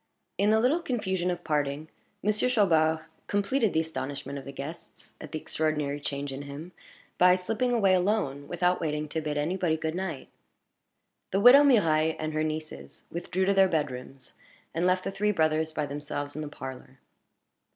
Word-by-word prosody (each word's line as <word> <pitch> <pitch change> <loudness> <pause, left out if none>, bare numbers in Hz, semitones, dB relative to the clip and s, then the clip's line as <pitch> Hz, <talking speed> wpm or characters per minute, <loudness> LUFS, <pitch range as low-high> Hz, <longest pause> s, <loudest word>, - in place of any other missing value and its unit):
In 205 - +3
the 220 0 +4
little 260 +9 +3
confusion 190 - -1
of 175 -1 -3
parting, 150 -1 -1 0.4
Monsieur 210 +4 +1
Chaubard 160 -9 +3 0.3
completed 205 +3 +1
the 160 - +2
astonishment 140 -2 -5
of 135 - -12
the 140 - -7
guests 140 +5 -9
at - - -9
the 155 - -3
extraordinary 150 -2 -1
change 140 -1 -4
in 135 - -6
him, 145 +5 -8 0.5
by 180 0 +7
slipping 225 +7 -1
away 200 -6 +3
alone, 180 -7 0
without 180 +1 +1
waiting 150 -1 -2
to 160 - -2
bid 150 -1 -3
any 160 +6 -1
body 165 -4 +1
good 160 0 -3
night. 175 -6 -4 1.0
The 195 - +1
widow 245 +7 +9
Mirailhe 160 - +4
and 155 0 -3
her 155 0 0
nieces 155 0 -6
withdrew 180 +2 -1
to 200 - +3
their 195 -1 +5
bedrooms, 135 -4 -4 0.4
and 170 +2 +1
left 185 0 +2
the - - -3
three 210 +2 +1
brothers 160 -3 +1
by 150 -1 -2
themselves 145 0 -5
in 155 - -4
the 150 - -4
parlor. 130 -1 -9
160 Hz, 175 wpm, -28 LUFS, 150-190 Hz, 1.0 s, widow